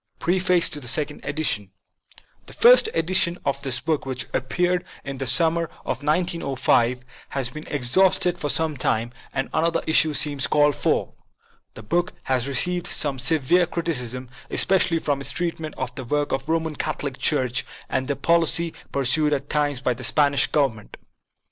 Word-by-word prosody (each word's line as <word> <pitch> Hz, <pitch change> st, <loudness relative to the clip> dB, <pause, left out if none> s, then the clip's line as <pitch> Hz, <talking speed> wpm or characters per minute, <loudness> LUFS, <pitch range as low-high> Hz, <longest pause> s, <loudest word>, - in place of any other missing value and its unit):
PREFACE 180 Hz, -1 st, +2 dB
TO 150 Hz, -, -4 dB
THE 125 Hz, -, -9 dB
SECOND 150 Hz, +3 st, -1 dB
EDITION 145 Hz, -10 st, -1 dB, 0.8 s
THE -, -, -11 dB
first 475 Hz, -1 st, +6 dB
edition 175 Hz, 0 st, +1 dB
of 140 Hz, 0 st, -1 dB
this 130 Hz, -3 st, -1 dB
book, 155 Hz, +3 st, -1 dB
which 130 Hz, -1 st, -3 dB
appeared 180 Hz, +7 st, 0 dB, 0.2 s
in 135 Hz, -1 st, -6 dB
the 135 Hz, -, -3 dB
summer 165 Hz, +7 st, +4 dB, 0.2 s
of 130 Hz, -, -3 dB
1905, 140 Hz, -6 st, 0 dB, 0.3 s
has 130 Hz, -3 st, -1 dB
been 155 Hz, +3 st, -9 dB
exhausted 175 Hz, +7 st, +2 dB
for 150 Hz, -, -3 dB
some 160 Hz, -2 st, 0 dB
time, 115 Hz, -1 st, -1 dB, 0.2 s
and 135 Hz, -1 st, -2 dB
another 165 Hz, +1 st, 0 dB
issue 160 Hz, -1 st, +3 dB
seems 145 Hz, -2 st, +2 dB
called 145 Hz, 0 st, +3 dB
for. -, -, -1 dB, 0.6 s
The 115 Hz, -, -10 dB
book 175 Hz, +11 st, -1 dB
has 130 Hz, -1 st, 0 dB
received 175 Hz, +6 st, 0 dB
some 140 Hz, -3 st, -1 dB
severe 160 Hz, +6 st, +2 dB
criticism, 130 Hz, -8 st, -2 dB, 0.2 s
especially 180 Hz, -3 st, +2 dB
for 145 Hz, -3 st, -1 dB
its 140 Hz, -, -1 dB
treatment 165 Hz, -3 st, -4 dB
of 125 Hz, -1 st, -4 dB
the 130 Hz, 0 st, -7 dB
work 145 Hz, +4 st, -1 dB
of 135 Hz, +1 st, -2 dB
the -, -, -1 dB
Roman 160 Hz, -2 st, -1 dB
Catholic 145 Hz, -3 st, -3 dB
Church 130 Hz, -4 st, +2 dB, 0.2 s
and 130 Hz, 0 st, -2 dB
the 140 Hz, -, -1 dB
policy 170 Hz, +2 st, +2 dB, 0.2 s
pur 140 Hz, -1 st, -1 dB
sued 150 Hz, +4 st, +2 dB
at 140 Hz, 0 st, -3 dB
times 145 Hz, -3 st, 0 dB
by 130 Hz, -2 st, +1 dB
the 125 Hz, +1 st, -10 dB
Spanish 140 Hz, +2 st, +3 dB
Government. 130 Hz, -8 st, -1 dB
145 Hz, 165 wpm, -23 LUFS, 130-165 Hz, 0.8 s, first